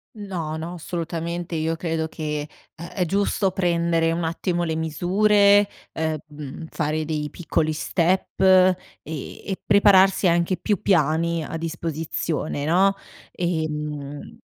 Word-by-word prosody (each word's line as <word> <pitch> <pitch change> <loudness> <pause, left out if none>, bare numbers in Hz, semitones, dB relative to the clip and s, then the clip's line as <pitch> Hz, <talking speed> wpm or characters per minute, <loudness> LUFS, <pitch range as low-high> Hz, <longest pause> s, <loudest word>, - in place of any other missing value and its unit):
No, 180 -7 -4
no, 165 +2 -5
assolutamente. 170 0 -4
Io 160 +1 0
credo 160 -1 -2
che, 150 -2 -4 0.3
ehm, 170 +1 -8
è 180 - -2
giusto 195 +1 +1
prendere 170 -2 +1
un 170 +1 -1
attimo 175 +1 -1
le 160 -2 -1
misure, 200 +6 +4 0.3
ehm, 155 -1 -5
fare 155 0 -1
dei 150 -1 -2
piccoli 160 -1 -1
step 175 +5 0
ehm, 185 -1 +6 0.3
e 160 +5 -6
prepararsi 195 -1 +5
anche 170 +2 +2
più 205 -5 -1
piani 165 -1 +2
a 165 - -5
disposizione, 160 -2 -3
no? 190 +5 +3 0.4
Ehm 150 -4 -4
165 Hz, 120 wpm, -23 LUFS, 155-185 Hz, 0.4 s, ehm